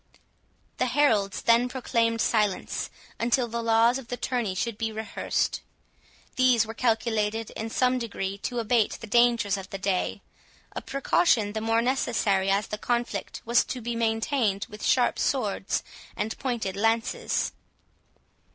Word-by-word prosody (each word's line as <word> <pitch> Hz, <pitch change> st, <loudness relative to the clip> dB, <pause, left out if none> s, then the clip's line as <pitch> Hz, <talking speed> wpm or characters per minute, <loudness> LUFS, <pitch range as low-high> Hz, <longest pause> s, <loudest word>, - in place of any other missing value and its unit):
The -, -, +1 dB
heralds 235 Hz, -7 st, +2 dB
then 235 Hz, +2 st, +4 dB
proclaimed 230 Hz, -3 st, 0 dB
silence 210 Hz, -4 st, 0 dB, 0.3 s
until 240 Hz, +1 st, +1 dB
the 235 Hz, 0 st, -3 dB
laws 230 Hz, +2 st, +3 dB
of 255 Hz, -, -11 dB
the 245 Hz, -, -4 dB
tourney 240 Hz, -8 st, -2 dB
should 230 Hz, +4 st, -2 dB
be 225 Hz, +1 st, -2 dB
rehearsed. 220 Hz, 0 st, -2 dB, 0.8 s
These 250 Hz, -3 st, +4 dB
were 225 Hz, -, -7 dB
calculated 225 Hz, -2 st, 0 dB
in 220 Hz, +1 st, -5 dB
some 255 Hz, +2 st, +2 dB
degree 200 Hz, -4 st, -4 dB
to 245 Hz, +4 st, -4 dB
abate 230 Hz, -1 st, +2 dB
the -, -, -8 dB
dangers 230 Hz, -2 st, +3 dB
of 190 Hz, -1 st, -8 dB
the 195 Hz, -, -5 dB
day; 195 Hz, -1 st, -1 dB, 0.5 s
a -, -, -5 dB
precaution 255 Hz, -6 st, +2 dB
the 220 Hz, -, -3 dB
more 225 Hz, +1 st, +2 dB
necessary, 220 Hz, -6 st, +1 dB
as 200 Hz, +1 st, +2 dB
the 210 Hz, -, -5 dB
conflict 235 Hz, -5 st, -2 dB
was 235 Hz, +1 st, +4 dB
to 255 Hz, -, -5 dB
be 235 Hz, 0 st, -4 dB
maintained 225 Hz, -2 st, 0 dB
with 210 Hz, 0 st, -9 dB
sharp 245 Hz, -2 st, +2 dB
swords 210 Hz, -7 st, 0 dB, 0.3 s
and 220 Hz, +1 st, -2 dB
pointed 235 Hz, -8 st, -2 dB
lances. 225 Hz, +3 st, 0 dB
230 Hz, 145 wpm, -26 LUFS, 210-240 Hz, 0.8 s, then